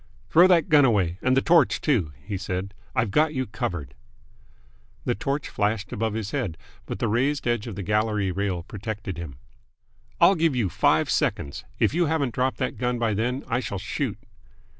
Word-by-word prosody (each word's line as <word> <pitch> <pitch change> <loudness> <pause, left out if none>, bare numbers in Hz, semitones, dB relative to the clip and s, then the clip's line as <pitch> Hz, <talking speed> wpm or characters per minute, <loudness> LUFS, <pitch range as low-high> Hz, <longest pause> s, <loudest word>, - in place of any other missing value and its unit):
"Throw 175 +3 +7
that 175 -2 +4
gun 150 -4 +6
away, 95 -8 +2
and 130 +1 +2
the 135 - +3
torch, 165 -4 +4
too," 110 - +1
he 100 +1 -4
said. 95 +1 -4 0.2
"I've 115 -6 +1
got 155 +5 +2
you 130 0 0
covered!" 95 - -4 1.1
The - - +1
torch 140 +7 -2
flashed 105 -1 -1
above 110 0 -1
his 110 -2 -3
head, 115 - -2 0.3
but - - -4
the 115 - -1
raised 135 +6 0
edge 120 -1 0
of 110 - -6
the 100 - -5
gallery 105 0 +1
rail 95 -2 -2
protected 105 -2 -6
him. 75 -7 -7 0.8
"I'll - - +7
give 165 -5 +1
you 115 -7 +1
five - - +2
seconds. 70 - -1
If - - +2
you 175 0 +2
haven't 145 -6 0
dropped 130 +1 0
that - - -2
gun 125 -1 0
by 115 -2 0
then, 125 +6 -1
I 120 -1 0
shall 100 -6 -4
shoot!" - - -3
110 Hz, 185 wpm, -25 LUFS, 100-135 Hz, 1.1 s, Throw